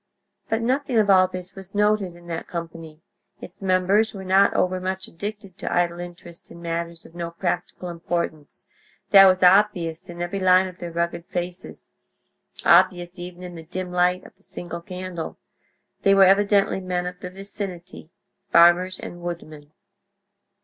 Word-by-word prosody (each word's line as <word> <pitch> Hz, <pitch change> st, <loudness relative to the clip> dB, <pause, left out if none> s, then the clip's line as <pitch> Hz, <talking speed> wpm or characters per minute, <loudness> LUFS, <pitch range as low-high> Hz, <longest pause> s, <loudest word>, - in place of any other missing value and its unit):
But 225 Hz, +1 st, 0 dB
nothing 260 Hz, 0 st, 0 dB
of 210 Hz, -2 st, +4 dB
all 185 Hz, -1 st, +6 dB
this 185 Hz, 0 st, -6 dB
was 195 Hz, 0 st, -11 dB
noted 210 Hz, -3 st, +1 dB
in 175 Hz, 0 st, -16 dB
that 165 Hz, -1 st, -5 dB
company; 165 Hz, -2 st, -8 dB, 0.4 s
its -, -, -12 dB
members 195 Hz, +3 st, +2 dB
were 190 Hz, -, -7 dB
not 190 Hz, +2 st, +4 dB
overmuch 185 Hz, +1 st, -1 dB
addicted 200 Hz, +1 st, -8 dB
to -, -, -4 dB
idle 175 Hz, -1 st, +1 dB
interest 175 Hz, -1 st, -10 dB
in 170 Hz, -, -12 dB
matters 170 Hz, 0 st, -4 dB
of -, -, -15 dB
no 170 Hz, -1 st, -4 dB
practical 175 Hz, +1 st, -3 dB
importance; 170 Hz, -3 st, -4 dB, 0.5 s
that 195 Hz, -1 st, +10 dB
was 185 Hz, 0 st, +3 dB
obvious 180 Hz, -3 st, +3 dB
in 175 Hz, 0 st, -9 dB
every 175 Hz, +3 st, -3 dB
line 185 Hz, 0 st, +5 dB
of 185 Hz, -1 st, -11 dB
their 175 Hz, -, -5 dB
rugged 170 Hz, 0 st, -2 dB
faces—obvious 175 Hz, 0 st, -1 dB
even 180 Hz, 0 st, -8 dB
in 180 Hz, -1 st, -8 dB
the 165 Hz, -, -9 dB
dim 180 Hz, +2 st, -6 dB
light 180 Hz, +1 st, +1 dB
of -, -, -15 dB
the -, -, -31 dB
single 170 Hz, -3 st, -7 dB
candle. 180 Hz, -3 st, -6 dB, 0.6 s
They 195 Hz, 0 st, +4 dB
were 195 Hz, -, +7 dB
evidently 200 Hz, 0 st, +3 dB
men 180 Hz, -1 st, -2 dB
of 180 Hz, 0 st, -6 dB
the 180 Hz, -, -7 dB
vicinity—farmers 185 Hz, -1 st, 0 dB
and 175 Hz, -, -8 dB
woodmen. 155 Hz, -4 st, -7 dB
180 Hz, 155 wpm, -23 LUFS, 170-190 Hz, 0.6 s, that